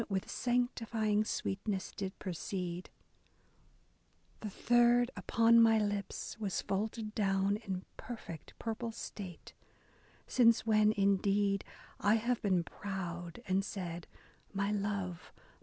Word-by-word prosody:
With 190 -2 -2
sanctifying 230 -4 +1
sweetness, 195 -1 -2
did 190 -1 -4
precede. 180 -1 -4 1.5
The 215 - -4
third 240 +3 +4
upon 230 0 +5
my 225 -1 +6
lips 205 0 -2
was 200 -4 -1
folded 215 +2 -2
down 195 -1 +2
In 190 -4 -5
perfect, 195 -10 -8
purple 230 0 -3
state; 195 -5 -8 0.7
since 230 -3 +4
when, 215 -1 +5
indeed, 200 0 +2 0.4
I 205 +2 +4
have 235 +2 0
been 185 -4 +2
proud 175 +1 -5
and 190 +1 +2
said, 175 -4 -5 0.3
' - - -33
My 200 +1 0
love, 200 -4 -2
my - - -25
own! - - -26
205 Hz, 120 wpm, -34 LUFS, 190-225 Hz, 1.5 s, my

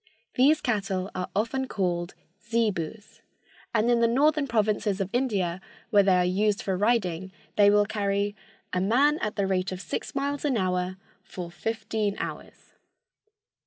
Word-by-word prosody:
These 285 +5 +4
cattle 195 -5 -1
are 180 0 -4
often 245 +6 0
called 175 -5 -2 0.3
zebus, 215 -4 -2 0.5
and 225 0 +2
in 240 -1 +4
the 230 - +4
northern 285 +4 +2
provinces 215 -3 +1
of 195 -1 -2
India, 195 -8 0 0.3
where 205 -2 +6
they 195 -2 +4
are 180 0 +3
used 205 +3 +1
for 190 - -1
riding, 190 -4 0 0.2
they 205 -1 +6
will 205 0 +4
carry 205 -1 -1 0.4
"a 180 - +1
man 275 - +3
at 210 -1 -2
the 200 - +1
rate 190 -1 0
of 185 - -5
six 180 +7 -5
miles 280 +1 -1
an 280 -5 +1
hour 185 -1 -1 0.2
for 175 -2 -8
fifteen 215 0 -2
hours." - - -7
205 Hz, 155 wpm, -27 LUFS, 185-235 Hz, 0.5 s, where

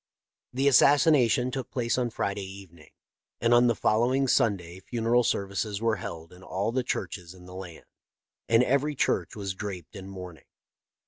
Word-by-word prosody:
" - - -65
The 135 +2 +1
assassination 135 -3 +4
took 130 -2 -5
place 120 -2 -1
on 125 -2 0
Friday 100 -2 -3
evening, 95 -4 -11 0.5
and 115 0 +3
on 120 +1 +6
the 120 - +2
following 125 +7 +2
Sunday 95 -7 +1
funeral 120 +4 +1
services 100 0 -2
were 115 -1 +1
held 85 -2 -8
in 90 - -15
all 95 +4 -2
the 130 +2 0
churches 90 -7 -5
in 90 -1 -15
the 90 - -11
land, 90 -3 -9 0.6
and 115 +1 +5
every 140 +3 +1
church - - 0
was 100 -2 -4
draped 95 -4 -7
in 95 -1 -8
mourning." 90 -6 -10
110 Hz, 170 wpm, -27 LUFS, 95-125 Hz, 0.6 s, on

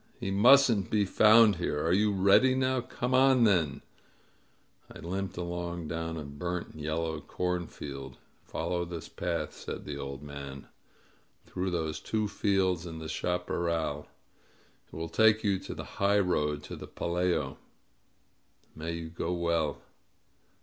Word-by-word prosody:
He 95 - -3
mustn't 115 0 +5
be 105 -2 +2
found 110 +1 +6
here! 75 -4 -1
Are 85 - +3
you 105 +2 +3
ready 100 +7 +5
now? 130 -1 +1
Come 125 +1 -3
on 130 -1 +5
then 85 -10 +2 0.5
!" - - -37
I - - -11
limped 95 +3 -4
along 85 -2 -4
down 80 0 -3
through 80 - -5
a - - -10
burnt, 85 +5 -5
yellow 80 +1 -2
corn 90 +3 -2
field. 70 -3 -8 0.3
"Follow 90 -1 -2
this 85 -2 -7
path," - - -3
said - - -7
the 70 -1 -5
old 70 0 -6
man, 70 -1 -8 0.8
"through 95 +1 -3
those 80 -3 -2
two 110 -1 -1
fields 95 -4 0
and 80 -1 -7
the 80 - -6
chaparral. 85 -3 -2 0.8
It - - -14
will 80 +1 -4
take 110 +5 +4
you 100 -3 +1
to - - -7
the - - -6 0.2
highroad 90 -7 +2
to - - -7
the - - -9
Pelayo. 85 -5 -1 1.2
May 80 +2 -4
you 85 -1 -5
go 85 0 -3
well!" 85 -3 0
85 Hz, 150 wpm, -30 LUFS, 80-100 Hz, 1.2 s, found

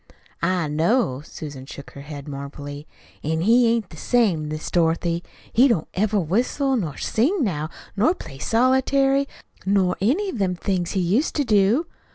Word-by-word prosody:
"I 175 -1 +1
know." 155 - +1
Susan 145 -4 -8
shook 140 - -10
her 140 - -10
head 145 0 -8
mournfully. 145 +1 -7 0.4
"An' 160 +2 0
he 235 +5 +5
ain't 230 -2 0
the 160 - -11
same, 190 -9 +2
Miss 155 0 -5
Dorothy. 170 0 +1 0.3
He 255 +4 +6
don't 200 - +1
ever 210 +2 +1
whistle 245 - +1
nor 165 - -2
sing 295 - +1
now, 155 -8 -1 0.3
nor 240 - +3
play 135 - -10
solitary, 270 - +3 0.4
nor 190 -2 +2
any 320 - +2
of 250 - -5
them 185 -2 +1
things 180 -1 -1
he 190 - +1
used 205 - +1
to 290 - +2
do. 215 - +3
190 Hz, 165 wpm, -23 LUFS, 155-245 Hz, 0.4 s, He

